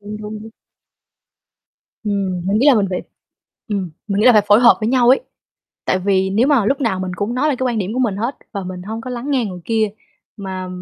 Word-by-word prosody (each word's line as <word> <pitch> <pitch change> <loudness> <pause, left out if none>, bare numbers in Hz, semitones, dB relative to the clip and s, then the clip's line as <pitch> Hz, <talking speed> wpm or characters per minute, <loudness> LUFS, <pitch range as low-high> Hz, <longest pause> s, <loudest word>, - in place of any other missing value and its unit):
Đúng, 210 +1 -7
đúng, 210 0 -7
đúng. 225 - -10 1.5
Ừm, 195 -3 -1
mình 200 +2 +2
nghĩ 265 - +3
là 280 - +7
mình 205 -3 +2
phải 180 - -2 0.7
ừm, 195 -4 -2 0.2
mình 200 0 0
nghĩ 225 - +3
là 250 - +8
phải 210 -2 +5
phối 205 +3 +6
hợp 235 - +7
với 215 - 0
nhau 245 -1 +3
ấy, 260 - +6 0.6
tại 185 - +1
vì 190 0 +1
nếu 220 +7 +2
mà 280 -7 +3
lúc 275 +4 +1
nào 225 -8 0
mình 185 -1 -3
cũng 215 +4 -2
nói 290 +4 +1
lên 275 - 0
cái 260 - 0
quan 235 -3 -1
điểm 200 +2 -2
của 255 - -3
mình 225 -7 0
hết 235 +7 -2 0.2
và 200 -3 -4
mình 180 0 -6
hông 220 +3 -5
có 255 - -7
lắng 250 +3 -4
nghe 260 -4 +1
người 185 -4 -6
kia 220 -2 +1 0.5
mà 190 -3 -5
215 Hz, 245 wpm, -19 LUFS, 195-245 Hz, 1.5 s, là